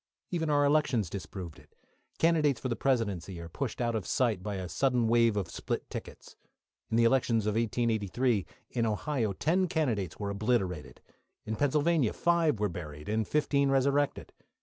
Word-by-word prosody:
Even 165 Hz, -3 st, -1 dB
our 145 Hz, -1 st, +3 dB
elections 140 Hz, -, +2 dB
disproved 95 Hz, -5 st, -7 dB
it. -, -, -22 dB, 0.4 s
Candidates 155 Hz, -6 st, +3 dB
for 130 Hz, -, -3 dB
the 120 Hz, -, 0 dB
Presidency 100 Hz, -9 st, -1 dB
are 85 Hz, -, -7 dB
pushed 120 Hz, +7 st, -4 dB
out 120 Hz, -1 st, 0 dB
of 110 Hz, -4 st, -3 dB
sight 115 Hz, -7 st, +1 dB
by 105 Hz, +1 st, -4 dB
a 95 Hz, -1 st, -4 dB
sudden 125 Hz, +3 st, +1 dB
wave 115 Hz, -2 st, +3 dB
of 95 Hz, -4 st, -1 dB
split -, -, -4 dB
tickets. -, -, -8 dB, 0.5 s
In 110 Hz, -, +1 dB
the 115 Hz, -, +5 dB
elections 115 Hz, -3 st, +3 dB
of 105 Hz, -, +1 dB
1883, 115 Hz, -1 st, 0 dB, 0.2 s
in 115 Hz, -2 st, 0 dB
Ohio 110 Hz, 0 st, -1 dB
ten 175 Hz, -, +1 dB
candidates 115 Hz, -, -1 dB
were 100 Hz, -1 st, -3 dB
obliterated; 100 Hz, -6 st, -1 dB, 0.4 s
in 110 Hz, -, -2 dB
Pennsylvania 145 Hz, -1 st, +2 dB
five 170 Hz, -7 st, +2 dB
were 105 Hz, -, +2 dB
buried 75 Hz, -4 st, -7 dB
and 110 Hz, 0 st, 0 dB
fifteen 140 Hz, -2 st, +2 dB
resurrected. 140 Hz, +1 st, +1 dB
115 Hz, 165 wpm, -30 LUFS, 100-140 Hz, 0.5 s, the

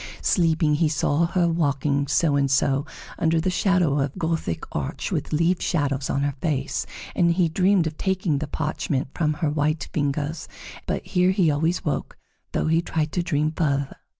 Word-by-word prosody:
Sleeping, 160 Hz, -3 st, +2 dB
he 155 Hz, +1 st, +2 dB
saw 150 Hz, +2 st, +1 dB
her 175 Hz, 0 st, +1 dB
walking 145 Hz, -3 st, 0 dB
so 145 Hz, +1 st, +2 dB
and 140 Hz, -1 st, +2 dB
so 135 Hz, +2 st, +2 dB, 0.3 s
under 165 Hz, 0 st, +2 dB
the 185 Hz, +3 st, 0 dB
shadow 180 Hz, -6 st, +2 dB
of 135 Hz, 0 st, -2 dB
Gothic 160 Hz, -, -2 dB
arch 70 Hz, -3 st, -3 dB
with -, -, -2 dB
leaf 170 Hz, +4 st, +2 dB
shadows 140 Hz, -5 st, 0 dB
on 140 Hz, -, 0 dB
her 145 Hz, 0 st, 0 dB
face, 140 Hz, -4 st, -1 dB, 0.3 s
and 170 Hz, -1 st, +3 dB
he 175 Hz, -1 st, +2 dB
dreamed 185 Hz, +2 st, +2 dB
of 155 Hz, 0 st, -4 dB
taking 190 Hz, -6 st, 0 dB
the 155 Hz, -, -4 dB
parchment 145 Hz, -2 st, -2 dB
from 155 Hz, -2 st, 0 dB
her 155 Hz, 0 st, -1 dB
white 150 Hz, 0 st, -1 dB
fingers 145 Hz, +1 st, -2 dB, 0.3 s
and -, -, -17 dB
But -, -, -2 dB
here 180 Hz, 0 st, +2 dB
he 185 Hz, -4 st, +3 dB
always 160 Hz, +5 st, 0 dB
woke, 150 Hz, -, -3 dB, 0.3 s
though -, -, -1 dB
he 160 Hz, +1 st, +3 dB
tried 155 Hz, -2 st, -2 dB
to 180 Hz, -, 0 dB
dream 155 Hz, -3 st, 0 dB
farther. 140 Hz, -4 st, -1 dB
155 Hz, 180 wpm, -24 LUFS, 145-170 Hz, 0.3 s, and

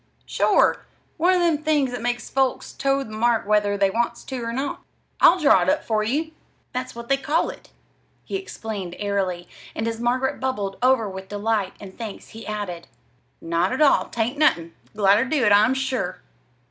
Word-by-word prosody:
"Sure! -, -, +2 dB, 0.3 s
One 360 Hz, +3 st, +3 dB
of 360 Hz, -, +2 dB
them 335 Hz, -4 st, +2 dB
things 300 Hz, -4 st, +1 dB
that 245 Hz, -2 st, -5 dB
makes 240 Hz, 0 st, -2 dB
folks 265 Hz, -1 st, -1 dB
toe 275 Hz, 0 st, 0 dB
the 220 Hz, -, -11 dB
mark 225 Hz, 0 st, +1 dB
whether 205 Hz, -1 st, +2 dB
they 195 Hz, -1 st, +2 dB
wants 235 Hz, +3 st, -1 dB
to 260 Hz, -3 st, -5 dB
or 230 Hz, -, -3 dB
not. 270 Hz, +4 st, -3 dB, 0.4 s
I'll 365 Hz, -, +6 dB
draw 280 Hz, -, +5 dB
it 175 Hz, -, +1 dB
up -, -, +1 dB
for 215 Hz, -1 st, 0 dB
you 300 Hz, +9 st, -1 dB, 0.4 s
that's 255 Hz, 0 st, -4 dB
what 235 Hz, 0 st, -8 dB
they 275 Hz, -, +3 dB
call 300 Hz, +4 st, 0 dB
it," -, -, -16 dB, 0.6 s
he -, -, -5 dB
explained 215 Hz, -, -5 dB
airily; 190 Hz, -4 st, -2 dB, 0.3 s
and 225 Hz, -, -2 dB
as 225 Hz, 0 st, -3 dB
Margaret 250 Hz, +3 st, 0 dB
bubbled 205 Hz, -7 st, -2 dB
over 255 Hz, -3 st, +3 dB
with 190 Hz, 0 st, -8 dB
delight 205 Hz, -1 st, -1 dB
and 190 Hz, -2 st, -11 dB
thanks 220 Hz, -4 st, -8 dB
he 225 Hz, +1 st, -10 dB
added: 205 Hz, -5 st, -5 dB, 0.5 s
"Not 170 Hz, +5 st, 0 dB
at 260 Hz, -, -2 dB
all. 285 Hz, -, +4 dB
'Tain't 240 Hz, +5 st, -2 dB
nothin'. 170 Hz, -, +2 dB, 0.2 s
Glad 200 Hz, -1 st, +4 dB
ter 230 Hz, -, +2 dB
do 270 Hz, -2 st, +1 dB
it, 210 Hz, -, +4 dB
I'm 215 Hz, +6 st, +5 dB
sure!" 265 Hz, -1 st, -2 dB
230 Hz, 190 wpm, -23 LUFS, 205-265 Hz, 0.6 s, I'll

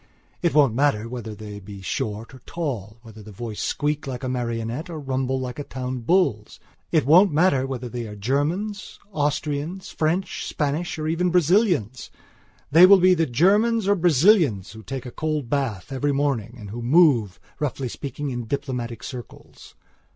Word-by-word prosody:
It 170 Hz, -3 st, +1 dB
won't 140 Hz, -6 st, +5 dB
matter 120 Hz, -4 st, +1 dB
whether 115 Hz, -3 st, -6 dB
they 105 Hz, -1 st, -8 dB
be 100 Hz, 0 st, -10 dB
short 105 Hz, +5 st, -4 dB
or 130 Hz, -, -12 dB
tall; 120 Hz, -, -4 dB
whether 110 Hz, -1 st, -12 dB
the 105 Hz, +1 st, -11 dB
voice 110 Hz, +1 st, -6 dB
squeak 150 Hz, 0 st, -1 dB
like 130 Hz, -2 st, -5 dB
a -, -, -2 dB
marionette 120 Hz, +5 st, -3 dB
or 165 Hz, -2 st, -6 dB
rumble 130 Hz, -1 st, -1 dB
like 125 Hz, +1 st, -5 dB
a -, -, -3 dB
town 130 Hz, -1 st, -5 dB
bull's; 120 Hz, -, +1 dB, 0.3 s
it 155 Hz, -5 st, +3 dB
won't 180 Hz, +7 st, +6 dB
matter 145 Hz, -4 st, +2 dB
whether 130 Hz, -2 st, -4 dB
they 120 Hz, -1 st, -5 dB
are 105 Hz, -, -8 dB
Germans, 155 Hz, -, -2 dB
Austrians, 150 Hz, +3 st, -2 dB
French, 165 Hz, +5 st, -1 dB
Spanish, 150 Hz, +4 st, -2 dB
or 155 Hz, 0 st, -3 dB
even 170 Hz, +3 st, +1 dB
Braziliansthey 175 Hz, -, +2 dB, 0.6 s
will 185 Hz, +4 st, +9 dB
be 185 Hz, +1 st, +5 dB
the 165 Hz, -2 st, +1 dB
Germans 205 Hz, -, +3 dB
or 200 Hz, -, +5 dB
Brazilians 165 Hz, -, +3 dB
who 110 Hz, +1 st, -11 dB
take 130 Hz, +2 st, -6 dB
a 125 Hz, -, -7 dB
cold 155 Hz, -5 st, -3 dB
bath 135 Hz, -6 st, -2 dB
every 140 Hz, +2 st, 0 dB
morning 135 Hz, -5 st, -1 dB
and 105 Hz, -3 st, -9 dB
who 120 Hz, +2 st, -6 dB
move, 120 Hz, -, +3 dB, 0.2 s
roughly 135 Hz, -2 st, -2 dB
speaking, 140 Hz, +3 st, -5 dB
in 120 Hz, -1 st, -4 dB
diplomatic 125 Hz, -4 st, -4 dB
circles. 125 Hz, -3 st, -10 dB
135 Hz, 165 wpm, -23 LUFS, 115-160 Hz, 0.6 s, will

